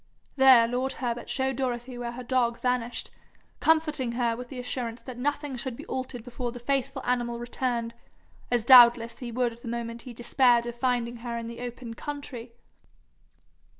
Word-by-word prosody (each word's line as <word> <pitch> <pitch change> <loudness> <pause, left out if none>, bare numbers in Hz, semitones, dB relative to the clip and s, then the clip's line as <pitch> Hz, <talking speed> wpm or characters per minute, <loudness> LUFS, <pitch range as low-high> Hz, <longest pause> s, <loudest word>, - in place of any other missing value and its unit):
There 260 -4 +7
lord 250 +3 -1
Herbert 240 -2 -4
showed 265 -2 0
Dorothy 250 -1 -3
where 240 -1 -5
her 250 +1 -7
dog 240 -1 +1
vanished, 250 -1 -1 0.5
comforting 305 -6 +2
her 235 -1 0
with 245 +1 -8
the 260 - -7
assurance 245 -1 -4
that 255 - -8
nothing 290 +1 -2
should 250 0 -4
be - - -9
altered 255 -2 -5
before 245 0 -4
the 245 - -8
faithful 270 +1 -1
animal 240 -1 0
returned, 240 -1 -2 0.6
as 240 -2 +1
doubtless 235 -2 +7
he 245 -2 -6
would 235 -1 -1
the - - -9
moment 235 0 -4
he 250 - -9
despaired 240 0 +3
of 240 - -4
finding 240 -1 -1
her 235 0 -5
in 230 - -5
the 235 0 -7
open 245 -1 -6
country. 260 -3 -7
245 Hz, 170 wpm, -27 LUFS, 235-255 Hz, 0.6 s, There